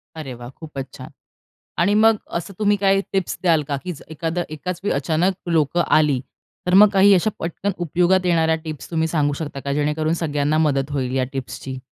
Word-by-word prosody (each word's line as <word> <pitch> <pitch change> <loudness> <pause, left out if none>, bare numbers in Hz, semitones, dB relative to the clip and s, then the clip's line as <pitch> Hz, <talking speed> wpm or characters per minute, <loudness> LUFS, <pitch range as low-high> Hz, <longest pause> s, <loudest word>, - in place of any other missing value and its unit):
अरे 150 -5 -6
वाह! 120 0 -9
खूपच 140 -1 -8
छान. - - -10 0.7
आणि 180 +5 +3
मग 220 +1 +5 0.2
असं 175 +4 -7
तुम्ही 205 -1 +3
काही 195 0 +3
टिप्स 190 -2 -1
द्याल 165 -4 +3
का? 140 - -1
की 180 - -4
स - - -14
एखादं 165 +2 -2
एकाच 170 +4 -5
वेळी 205 - 0
अचानक 160 +7 +1 0.2
लोकं 165 +1 +2
आली, 150 -4 +3 0.5
तर 180 - +1
मग 205 +2 +8
काही 200 +1 +6
अशा 190 +3 +3
पटकन 175 +4 -2
उपयोगात 180 +2 +2
येणाऱ्या 165 -2 +3
टिप्स 155 -3 -7
तुम्ही 160 -1 +1
सांगू 150 -3 +1
शकता 145 -3 -5
का? 140 +1 -3
जेणेकरून 150 +2 0
सगळ्यांना 145 0 0
मदत 135 0 -1
होईल 130 -2 -2
या 130 - +2
टिप्सची. 135 0 -6
160 Hz, 190 wpm, -21 LUFS, 145-180 Hz, 0.7 s, मग